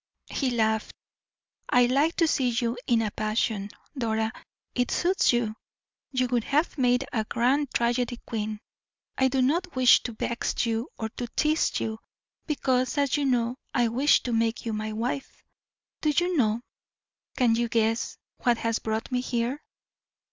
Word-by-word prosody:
He 270 - 0
laughed. 220 -2 0 0.7
"I 245 0 +5
like 280 +7 +2
to 330 - +3
see 265 -5 +2
you 235 0 0
in 230 -3 +3
a 210 - -2
passion, 215 -1 -1 0.3
Dora; 220 -3 -1 0.4
it 245 -1 0
suits 370 +2 +2
you; 235 -3 0 0.6
you 255 -2 +1
would 240 -2 0
have 300 +4 +1
made 250 -1 +2
a 220 -4 +1
grand 255 +5 +1
tragedy 240 0 0
queen. 215 -1 -3 0.5
I 265 - +3
do 260 0 +1
not 340 +6 0
wish 255 -1 +6
to 240 - -5
vex 235 +2 -1
you 230 +1 -1
or 220 - -3
to 240 +2 -5
tease 310 +1 +2
you, 220 0 -3 0.5
because, 260 -3 0
as 280 -2 +2
you 290 -1 0
know, 245 -1 +1 0.2
I 240 -3 +3
wish 265 +6 +3
to 245 - -2
make 225 +1 0
you 225 - -2
my 215 0 -3
wife. 240 +5 -4 0.6
Do 305 - +2
you 350 +4 +1
know, 225 -5 +2 0.8
can 245 -4 +4
you 235 +1 0
guess, 225 +1 0 0.2
what 240 -2 +2
has 230 0 -1
brought 220 +3 -3
me 250 0 +1
here?" 250 +3 -2
240 Hz, 160 wpm, -27 LUFS, 225-265 Hz, 0.8 s, wish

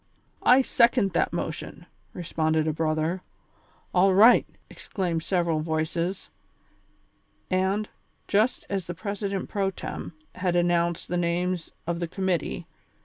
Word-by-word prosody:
"I 260 +2 +6
second 235 -6 +3
that - - +1
motion," 170 0 -5 0.3
responded 160 -2 0
a 155 - +1
brother. 160 +3 -1 0.7
"All 185 +1 +4
right! 225 +5 +7
" - - -39
exclaimed 175 -5 -3
several 170 -2 0
voices; 160 +3 -2 1.2
and, 190 +3 +1 0.4
just 215 +5 +1
as 195 -3 -3
the 175 - -5
president 200 0 -3
pro 200 -2 0
tem. 185 - -6 0.2
had 180 -1 -1
announced 175 -1 +1
the 180 - -1
names 175 0 -1 0.2
of 170 0 -2
this 170 -1 -3
com 190 +2 -4
mittee. 180 -5 -1
175 Hz, 130 wpm, -26 LUFS, 165-195 Hz, 1.2 s, right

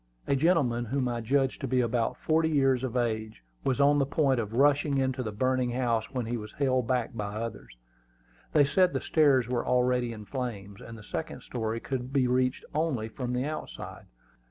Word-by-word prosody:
A 140 - +1
gentleman 135 -6 +2
whom 130 +2 -1
I 120 -1 -2
judged 135 +3 0
to 135 - -2
be 130 +1 +1
about 120 -1 0
forty 160 0 +1
years 135 -4 +2
of 130 -1 -2
age 110 - -2 0.2
was 135 0 0
on 145 +1 +5
the 140 - +3
point 140 -3 +2
of 110 -1 -4
rushing 145 +1 +3
into 130 -1 0
the 110 -4 -3
burning 130 +3 0
house 120 -3 0
when 125 -3 -2
he 120 +2 -2
was 105 -1 -8
held 130 -4 +1
back 125 -2 0
by 105 -2 -4
others. 110 - -6 0.8
They 145 -2 +6
said 180 +5 +3
the - - 0
stairs 140 -7 +3
were 120 -1 -1
already 125 -1 +1
in 105 -2 -8
flames, 100 -6 -5
and 115 0 -9
the 105 - -12
second - - -5
story 115 -2 -3
could 130 0 -4
be 135 -2 +2
reached 125 +1 +1
only 145 -8 -1
from 125 +2 -4
the 125 +2 0
outside. 155 +1 -7
125 Hz, 200 wpm, -28 LUFS, 115-135 Hz, 0.8 s, They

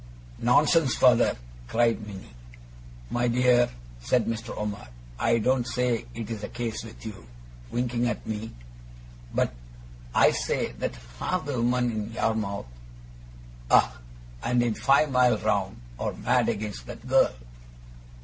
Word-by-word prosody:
'Nonsense, 145 +3 +4
father!' 125 -2 +4 0.3
cried 115 - +1
Minnie. 95 - -10 0.8
'My 120 0 +1
dear,' 120 0 +4 0.3
said 115 - +1
Mr. 115 0 -3
Omer, 105 -1 -4 0.3
'I 115 0 +3
don't 125 +2 +1
say 125 -2 0
it's 115 -2 -5
the 105 - -4
case 115 -3 -4
with 115 0 -11
you,' 100 - -8 0.4
winking 120 - 0
at - - -3
me, 110 +1 -4 0.8
'but - - 0 0.6
I - - +6
say - - -1
that - - -2 0.2
half 185 -5 -1
the 135 -5 -2
women 125 0 +2
in 110 0 -4
Yarmouth 110 - -1 1.0
ah! - - +4 0.4
and 120 0 +2
in 120 -2 +1
five 140 +5 +3
mile 125 -3 +4
round 100 -3 -1 0.2
are - - -2
mad - - +1
against 100 - -4
that - - -9
girl. - - +4
115 Hz, 130 wpm, -27 LUFS, 110-125 Hz, 1.0 s, I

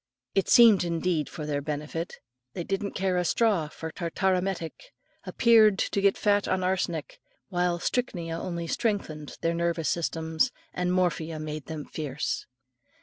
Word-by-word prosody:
It 195 - +1
seemed 225 -6 +7
indeed 170 -2 0
for 155 - -6
their 145 -1 -1
benefit: 150 +3 -4 0.4
they 175 - -4
didn't 195 +3 -2
care 185 -1 +1
a 180 - +2
straw 195 -3 +2
for 160 +1 -7
tartar 185 +3 0
emetic, 180 -3 -2 0.5
appeared 220 -4 +5
to 200 - 0
get 200 0 +3
fat 205 -1 +2
on 185 0 0
arsenic, 180 -4 -2 0.3
while 180 -2 +1
strychnia 175 -6 -2
only 170 -2 -4
strengthened 165 -6 -2
their 165 0 +1
nervous 170 -1 0
systems, 160 +3 0 0.2
and 180 0 0
morphia 170 -3 0
made 155 -1 -5
them 155 -2 -5
fierce. 150 -2 -3
175 Hz, 145 wpm, -27 LUFS, 160-190 Hz, 0.5 s, seemed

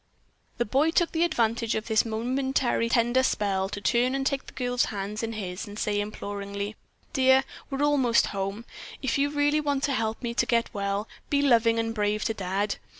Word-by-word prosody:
The 240 - +1
boy 275 +9 +2
took 340 0 +1
advantage 235 -9 +1
of 220 - -2
this 220 0 +2
momentary 245 +1 0
tender 240 +2 +3
spell 195 -6 0
to 205 - -5
turn 240 +6 +2
and 270 0 -1
take 275 0 -1
the - - -11
girl's 245 -1 0
hands 205 +1 -4
in 225 0 -3
his 195 -1 -5
and 205 0 -9
say 210 -2 0
imploringly: 200 0 -5 0.4
"Dear, 265 -2 +5 0.3
we're 275 0 -1
almost 265 -5 +3
home. 195 +3 -3 0.4
If 265 - 0
you 285 +1 +2
really 290 +1 +2
want 285 -2 -1
to 285 - +1
help 225 0 -2
me 235 -1 -2
to - - +2
get 235 -1 +1
well, 200 +1 -2 0.2
be 285 -1 +2
loving 230 -4 +4
and 225 0 -1
brave 210 -1 0
to 225 - 0
Dad. 200 +1 -2
230 Hz, 190 wpm, -27 LUFS, 205-265 Hz, 0.4 s, Dear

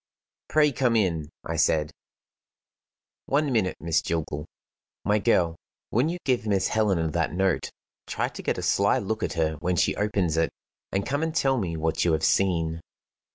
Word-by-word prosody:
"Pray 150 -1 +4
come 125 -3 +1
in," 85 -8 +1 0.2
I 80 - -3
said. 75 -1 +2 1.4
"One 145 0 +1
minute, 110 -6 +1
Miss 80 0 +1
Jillgall. 80 -2 -3 0.6
My 105 +1 +3
girl, 85 -4 +2 0.3
when 125 +8 +2
you 175 - -3
give 125 -4 +1
Miss 100 -2 +1
Helena 95 -7 +1
that 85 0 -1
note, 95 -1 0 0.4
try - - -1
to - - -8
get - - -1
a - - -4
sly 100 +5 +3
look 110 -2 -2
at - - -1
her 80 -2 0
when 90 +2 0
she - - +2
opens 100 -6 0
it, 80 -1 +2 0.4
and 95 +1 -1
come 140 +2 -1
and 160 0 -2
tell 135 -5 +2
me 85 -5 -3
what 80 0 0
you 85 - +2
have 80 - 0
seen." 85 -4 +1
95 Hz, 175 wpm, -26 LUFS, 80-110 Hz, 1.4 s, Pray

